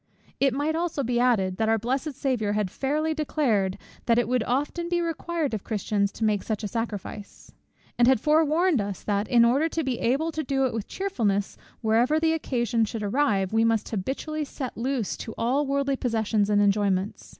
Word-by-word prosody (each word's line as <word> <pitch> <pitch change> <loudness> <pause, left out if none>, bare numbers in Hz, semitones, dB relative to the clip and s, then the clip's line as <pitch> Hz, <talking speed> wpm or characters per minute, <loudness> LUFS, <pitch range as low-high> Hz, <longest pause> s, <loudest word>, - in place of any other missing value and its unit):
It 275 -1 +3
might 290 +3 0 0.3
be 240 0 0
added 240 -6 +3
also, 185 0 -4
that 220 0 +1
our 225 - +3
blessed 265 +7 -2
Saviour 240 -7 -1
had 210 -3 -1
fairly 305 +4 -1
declared, 245 -11 0 0.3
that 230 -1 +4
it 240 - +2
would 250 0 +1
often 295 +7 -1
be 350 0 +1
required 335 -3 -2
of 210 - -3
Christians 205 -1 -1
to - - -5
make 210 -2 +2
such 220 0 -3
a - - -1
sacrifice; 210 -1 -6 0.5
and 240 - +6
had 265 -3 +5
forewarned 310 - +3
us, 200 -2 -5
that, 205 0 -1
in 235 -1 +5
order 275 +7 +2
to 325 0 -2
be 260 -3 -2
able 280 +7 +1
to 315 0 -3
do 270 0 +1
it 255 - -1
with 225 -3 -4
cheerfulness 220 - -1 0.3
whenever 235 +7 +3
the 320 0 +2
occasion 240 -7 0
should 220 0 -3
arrive, 205 -4 +1
we 225 0 +3
must 225 -1 +1
habitually 270 +9 -3
sit 265 -3 -6
loose 245 -2 -2
to 225 - -7
all 265 +5 +1
worldly 275 0 0
possessions 220 -4 0
and 205 0 +4
enjoyments. 200 -1 0
240 Hz, 195 wpm, -26 LUFS, 210-285 Hz, 0.5 s, and